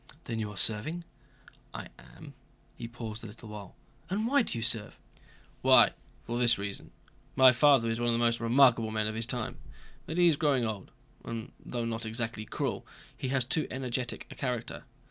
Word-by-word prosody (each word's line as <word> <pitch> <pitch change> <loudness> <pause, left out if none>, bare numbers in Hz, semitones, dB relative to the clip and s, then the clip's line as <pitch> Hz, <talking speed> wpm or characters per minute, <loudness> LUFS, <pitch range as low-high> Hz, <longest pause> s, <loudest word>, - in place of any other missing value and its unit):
"Then 115 -1 -4
you 105 -1 -2
are 105 - -10
serving?" 135 - +1 0.7
"I - - -6
am." - - -13 0.4
He 115 - -6
paused 115 -2 -7
a - - -6
little 110 +1 -11
while. 105 -3 -9 0.3
"And 205 +4 0
why 280 +4 +4
do 220 - -3
you 115 - -3
serve?" 115 -2 +1 0.6
"Why, - - +7 0.3
for 120 +1 -3
this 120 -1 +5
reason! 100 0 -4 0.5
My 130 -1 +8
father 130 -1 +5
is 115 0 -1
one 120 0 +1
of - - +2
the - - +1
most 120 0 +2
remarkable 115 -1 +4
men 110 -1 -1
of 110 - -1
his 115 +1 -2
time. 120 -3 -3 0.5
But 160 - -4
he 175 - +5
is 165 -4 +5
growing 140 -6 +2
old, 105 -4 -4 0.3
and 115 0 -6
though 120 -1 -3
not 115 -1 -3
exactly 115 -1 -3
cruel - - -3 0.3
he - - -4
has 130 -1 +1
too 150 +3 0
energetic 125 -1 -3
a - - -6
character. 125 -4 -4
115 Hz, 190 wpm, -30 LUFS, 110-130 Hz, 0.7 s, My